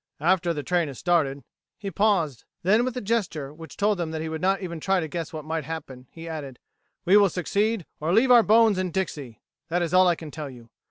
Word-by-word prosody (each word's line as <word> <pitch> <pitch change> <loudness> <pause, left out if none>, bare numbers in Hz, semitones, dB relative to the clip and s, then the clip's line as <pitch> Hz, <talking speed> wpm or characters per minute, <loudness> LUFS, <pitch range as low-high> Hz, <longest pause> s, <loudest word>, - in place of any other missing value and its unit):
After 175 +2 +2
the 150 -3 -3
train 175 -1 +1
has 135 -3 -8
started...." 145 -6 +1 0.3
He 200 -2 -5
paused; 185 - +1 0.2
then, 210 +6 +4
with 255 0 -3
a - - -2
gesture 185 -10 -2
which 160 -1 -12
told 205 -1 +1
them 170 -2 -2
that 160 0 -4
he 160 - -4
would 160 0 -5
not 195 +1 +2
even 170 -3 -5
try 190 +4 +1
to 160 - -3
guess 165 0 -5
what 155 -2 -7
might 160 0 -2
happen, 135 -5 -7
he 165 0 -10
added: 145 -6 -6 0.5
"We 190 +3 +6
will 200 -2 +5
succeed 200 +3 -1
or 155 +3 -1
leave 235 +7 +4
our 240 -1 +9
bones 220 -2 +4
in 185 -1 -1
Dixie! 150 - -4 0.2
That 175 +1 0
is 170 0 -3
all 185 0 +6
I 175 - +3
can 160 -2 -9
tell 150 -2 -6
you. 120 -3 -14
170 Hz, 235 wpm, -25 LUFS, 155-195 Hz, 0.5 s, our